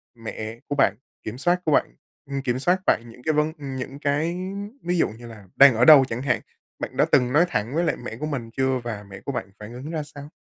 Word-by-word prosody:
mẹ 115 0 -7
của 145 - -2
bạn 105 -8 +3 0.3
kiểm 110 +3 -6
soát 175 +5 +1
của 155 - +1
bạn - - +2 0.3
ừm, 140 0 -2
kiểm 130 -1 -1
soát 180 +6 +2
bạn 115 - +3
những 125 +2 -15
cái 155 - +1
vấn 150 +1 +1
ừ, 140 - -8
những 135 +1 -5
cái 150 +4 0 0.5
ví 175 +1 0
dụ - - +2
như 120 +2 -11
là 105 -4 -12
đang 135 -3 +8
ở 120 +3 +4
đâu 145 -4 +9
chẳng 120 -1 -4
hạn. 135 -3 0 0.4
Bạn - - -6
đã - - +5
từng 125 +1 +3
nói 165 +4 +5
thẳng 115 +7 -2
với 170 - +2
lại - - +1
mẹ 115 - -5
của 150 - -2
mình 130 -7 -4
chưa 130 -1 +1
và 110 -4 -5
mẹ 95 - -10
của 140 - -2
bạn 125 -6 -4
phản 105 +3 -9
ứng 130 +5 -7
ra 155 -2 -2
sao? 145 0 -11
135 Hz, 260 wpm, -24 LUFS, 115-150 Hz, 0.5 s, đâu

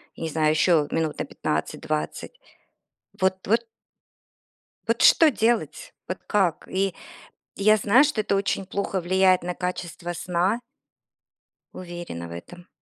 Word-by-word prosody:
я - - -8
не 160 - -2
знаю, 155 0 +1
еще 155 -1 +3
минут 160 -2 -1
на - - -1
15-20. 155 - -3 0.8
Вот 190 0 0
вот. 230 +3 +2 1.2
Вот - - +1
что 320 - +7
делать? 235 - -1
Вот - - -3
как? 190 -6 +1
И 195 0 -1 0.6
я 215 +2 +5
знаю, 225 +7 +5
что 285 -7 0
это 200 - 0
очень 195 -1 -1
плохо 200 0 -2
влияет 185 0 +3
на 180 0 -3
качество 175 -1 -4
сна. 180 +6 0 1.1
Уверена 175 - -7
в - - -11
этом. 175 - -10
185 Hz, 130 wpm, -24 LUFS, 170-200 Hz, 1.2 s, что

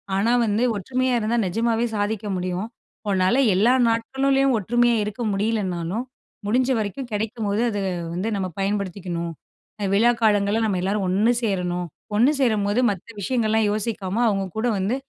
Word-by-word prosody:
ஆனா 205 +4 +2
வந்து, 215 +2 +1
ஒற்றுமையா 255 +5 -1
இருந்தா 225 +2 0
நிஜமாவே 230 +4 0
சாதிக்க 210 0 -2
முடியும். 180 +3 -3 0.4
உன்னால 190 +4 +2 0.2
எல்லா 220 +7 +4 0.2
நாட்களிலயும் 270 +3 +1
ஒற்றுமையா 240 +3 +2
இருக்க 210 +3 -5
முடியலன்னாலும், 195 -1 -1 0.4
முடிஞ்ச 250 +5 +1
வரைக்கும் 220 +5 -4
கெடைக்கும்போது 215 0 -1
அத 205 - -3 0.4
வந்து 185 +5 -2
நம்ம 190 -2 -1
பயன்படுத்திக்கணும், 190 -4 -2 0.6
விழா 230 +4 +5
காலங்கள்ல 210 0 +3
நம்ம 195 -4 0
எல்லாரும் 195 +1 0
ஒண்ணு 205 +6 +3
சேரணும். 180 -4 -1 0.3
ஒண்ணு 240 +7 +5
சேரும்போது 215 -4 +2
மத்த 195 -1 -5
விஷயங்கள்லாம் 220 -1 +1
யோசிக்காம, 210 -1 -2
அவுங்க 195 -2 0
கூட 225 +3 0
வந்து 195 +6 0
210 Hz, 135 wpm, -23 LUFS, 195-230 Hz, 0.6 s, விழா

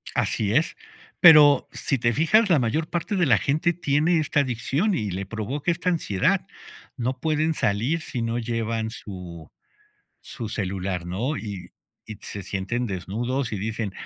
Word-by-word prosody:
Así 105 -2 0
es. 155 +4 +1 0.4
Pero, 150 -4 +8
si 135 - -1
te 120 0 +1
fijas, 195 - +3
la 170 - +4
mayor 150 +8 -1
parte 175 +4 -2
de 175 -4 +2
la 115 -6 +5
gente 150 - +1
tiene 160 +1 +1
esta 145 -1 +1
adicción, 140 - 0
y 105 - -2
le 95 +2 -4
provoca 115 - -3
esta 175 +2 -1
ansiedad. 130 - +1 0.5
No 125 +2 -2
pueden 155 0 +1
salir 120 +12 0
si 125 -6 -4
no 115 +1 -1
llevan 115 -1 -2
su 90 -8 -9 0.7
su 115 -4 -7
celular, 95 -3 -3
¿no? 115 - -2
Y 100 -7 -7 0.4
y 110 -1 -8
se 100 - -6
sienten 100 +6 -3
desnudos 115 +7 -3
y 105 - -2
dicen: 105 0 -3
120 Hz, 160 wpm, -24 LUFS, 100-155 Hz, 0.7 s, Pero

